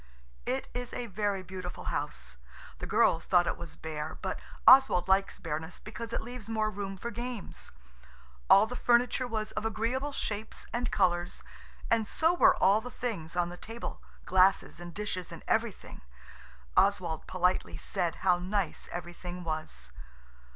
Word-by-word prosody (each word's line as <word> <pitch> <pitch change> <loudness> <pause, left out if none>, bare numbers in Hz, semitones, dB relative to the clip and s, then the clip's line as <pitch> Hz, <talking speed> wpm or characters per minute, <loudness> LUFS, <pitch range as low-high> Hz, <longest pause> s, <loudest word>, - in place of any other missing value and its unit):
It 130 - -1
is 245 0 -4
a 245 - -3
very 205 -2 -1
beautiful 185 -1 -7
house. - - -4 0.4
The - - -5
girls 165 - +3
thought 175 -1 +4
it - - 0
was 170 - -8
bare 155 0 -5
but - - -3 0.3
Oswald 260 -10 +8
likes 195 +1 +2
bareness 160 +1 -4
because 230 +1 -7
it - - -2
leaves 240 -2 -8
more 215 -1 +1
room 195 -1 -5
for 235 +5 -5
games. 240 -1 -6 0.8
All 200 - +8
the 245 +3 -6
furniture 245 +1 +3
was 220 -2 -2
of - - -3
agreeable 230 +6 -1
shapes 215 -5 -3
and 245 0 0
colours, 175 -2 +1 0.5
and 225 -2 +3
so 325 +9 +2
were 355 - +6
all 200 +3 +4
the 250 - -7
things 205 -11 -4
on 175 -1 +1
the 175 - -8
table–glasses 190 -4 0
and 175 0 -7
dishes 185 -2 -4
and 165 - -9
everything. 225 -2 -1 0.7
Oswald 180 -5 +2
politely 180 0 0
said 175 -4 -1
how 180 -2 +5
nice 190 0 -2
everything 175 +1 -6
was. 155 - -4
195 Hz, 150 wpm, -30 LUFS, 175-225 Hz, 0.8 s, Oswald